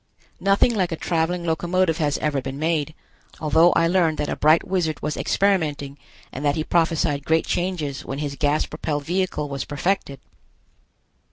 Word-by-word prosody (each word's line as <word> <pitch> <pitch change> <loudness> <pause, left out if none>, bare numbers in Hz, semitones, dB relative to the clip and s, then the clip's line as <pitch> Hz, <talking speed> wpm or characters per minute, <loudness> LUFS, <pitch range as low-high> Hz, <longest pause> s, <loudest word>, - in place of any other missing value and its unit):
Nothing 200 +5 +3
like 185 -5 0
a - - -1
traveling 170 +2 -1
locomotive 170 +1 +1
has 145 -2 +1
ever 145 -3 -1
been 135 +1 -6
made, 155 0 -1 0.4
although 160 +3 +4
I 165 - +3
learned 170 -3 +2
that 150 - -2
a - - -1
bright 155 +2 +3
wizard 175 -5 -1
was 150 0 -1
experimenting 150 -8 0 0.3
and 135 - -6
that 145 -1 +2
he 155 - -1
prophesied 160 -4 +1
great 160 +2 +1
changes 170 -7 -2
when 135 - -5
his 145 -1 -3
gas 145 +2 +1
propelled 150 -2 -4
vehicle 180 -3 -1
was 140 -1 -4
perfected. 145 -2 -2
160 Hz, 165 wpm, -23 LUFS, 145-175 Hz, 0.4 s, although